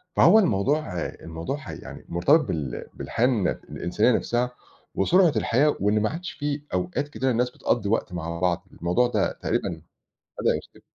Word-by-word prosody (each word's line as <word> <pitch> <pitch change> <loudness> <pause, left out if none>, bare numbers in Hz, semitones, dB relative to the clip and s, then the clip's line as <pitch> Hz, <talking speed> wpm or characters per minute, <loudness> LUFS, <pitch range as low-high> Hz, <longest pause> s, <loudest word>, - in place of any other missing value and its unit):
فهو 220 - +7
الموضوع 145 - +1
الموضوع 80 - -5
حَي 150 - -8
يعني - - -10
مرتبط 90 - +4
بال 75 - -3
بالحياة 115 - -1
الن 110 -8 +1
الإنسانية 105 +7 0
نَفْسها، 120 +1 -1 0.4
وسرعة 175 - +4
الحياة 145 +5 +2
وإن 105 +2 +2
ما 110 - +1
عادش 175 +4 -5
في 145 0 -3
أوقات 90 +10 -1
كتيرة 135 -2 -1
الناس 125 +1 +1
بتقضّي 115 -4 -1
وقت 105 -4 0
مع 85 -1 -4
بعض، 90 +1 0
الموضوع 90 +9 +1
ده 120 - +1
تقريبًا - - -2 0.6
بدأ - - +2
يختفي. - - -12
115 Hz, 160 wpm, -25 LUFS, 90-145 Hz, 0.6 s, فهو